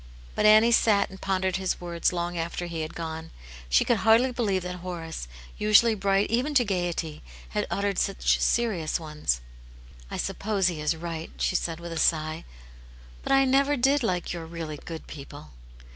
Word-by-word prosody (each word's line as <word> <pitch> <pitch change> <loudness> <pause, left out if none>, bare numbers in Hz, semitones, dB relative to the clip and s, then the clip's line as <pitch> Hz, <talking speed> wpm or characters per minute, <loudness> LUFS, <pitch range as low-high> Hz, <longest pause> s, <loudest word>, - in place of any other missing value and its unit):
But - - +3
Annie 215 +2 +7
sat 215 -4 +3
and 190 - -12
pondered 190 -1 0
his 190 -1 -2
words 170 -1 0
long 175 0 -3
after 170 +1 -3
he 170 -2 -4
had 155 - -5
gone; 160 -1 -5 0.4
she - - +4
could 240 - +2
hardly 225 +5 +4
believe 205 -7 0
that 180 0 -5
Horace, 170 - -6 0.3
usually 215 +2 +5
bright 195 0 +1
even 260 +6 0
to 250 -3 +5
gaiety, 175 -5 -2 0.3
had - - -2
uttered 200 -1 -1
such 195 - +1
serious 190 -10 +1
ones. 150 - -2 0.3
" - - -20
I - - -5
suppose 200 -3 0
he 160 -3 -5
is 150 +2 +1
right," 165 0 -5
she - - 0
said, 165 -1 -1
with 170 0 -7
a 165 - -3
sigh; 155 0 +1 0.8
"but - - -4
I 270 0 +5
never 275 +2 +3
did 275 +3 +3
like 180 -7 -1
your 165 -2 -6
really 165 -2 -6
good 165 +2 -8
people." 140 - -10
180 Hz, 180 wpm, -26 LUFS, 160-215 Hz, 0.8 s, Annie